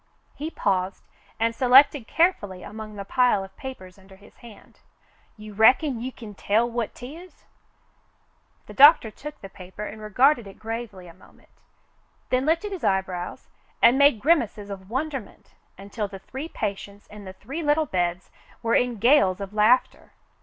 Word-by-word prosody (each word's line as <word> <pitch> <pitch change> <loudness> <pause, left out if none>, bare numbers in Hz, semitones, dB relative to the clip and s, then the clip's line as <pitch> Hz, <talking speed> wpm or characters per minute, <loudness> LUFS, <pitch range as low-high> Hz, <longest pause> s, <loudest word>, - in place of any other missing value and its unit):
He 305 +2 -6
paused, 190 - -2 0.4
and 230 +1 +1
selected 260 0 +5
carefully 205 - 0
among 215 0 -9
the 200 -1 -7
pile 245 -3 +2
of 190 0 -13
papers 200 -8 -10
under 190 0 -17
his 200 +2 -20
hand. 235 -4 -16 0.6
"You 215 0 -11
reckon 250 +4 +3
you 255 +2 -4
kin 220 -4 -11
tell 215 +4 +1
what 235 -2 -4
'tis 320 +9 -11
^ - - -32 0.7
" - - -41
The - - -12
doctor 285 -5 +7
took 300 +7 -10
the 195 - -8
paper 190 +2 -10
and 215 +1 -9
regarded 240 +3 +2
it 195 - -13
gravely 225 -4 -7
a 170 - -13
moment, 185 - -22 0.8
then 255 +3 +1
lifted 335 +6 0
his 380 -4 -6
eyebrows 185 -2 -2 0.3
and 255 +3 +5
made 280 -5 +5
grimaces 235 -10 +1
of 190 -1 -9
wonderment 270 -1 -5 0.2
until 200 +2 -5
the 195 -1 -9
three 265 - -8
patients 200 -3 -6
in 210 -1 -13
the 190 - -9
three 270 - -7
little 305 +1 +1
beds 180 -6 -2 0.3
were 230 0 0
in 245 -2 +1
gales 210 -5 +3
of 200 0 -7
laughter. 215 +4 +2
220 Hz, 165 wpm, -24 LUFS, 195-265 Hz, 0.8 s, doctor